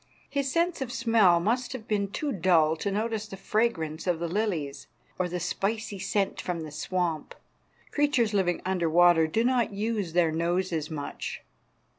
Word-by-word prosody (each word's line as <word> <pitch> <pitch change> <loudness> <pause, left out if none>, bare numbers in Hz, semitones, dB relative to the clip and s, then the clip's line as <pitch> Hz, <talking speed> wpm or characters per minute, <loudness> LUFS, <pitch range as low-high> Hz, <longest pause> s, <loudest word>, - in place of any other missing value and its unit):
His 280 -2 -1
sense 340 -1 +1
of 255 -2 -3
smell 225 -7 +4
must 240 +8 0
have 230 -4 -7
been 205 -2 0
too 290 +8 -2
dull 165 -5 +3
to 200 - -2
notice 215 +1 -2
the 195 - -8
fragrance 190 -7 -1
of 175 -2 +2
the 170 +1 -3
lilies 170 -7 -2 0.3
or 180 -1 0
the 180 +1 -3
spicy 200 +4 -2
scent 195 +1 -1
from 175 -2 -3
the 155 -1 -7
swamp. 170 +1 -2 0.6
Creatures 275 -7 +2
living 185 -3 +1
under 180 -3 0
water 170 -1 +5
do 220 +9 +1
not 245 -3 +1
use 205 -4 -2
their 170 -2 +3
noses 170 -1 -1
much. 145 -3 -5
190 Hz, 165 wpm, -28 LUFS, 170-225 Hz, 0.6 s, water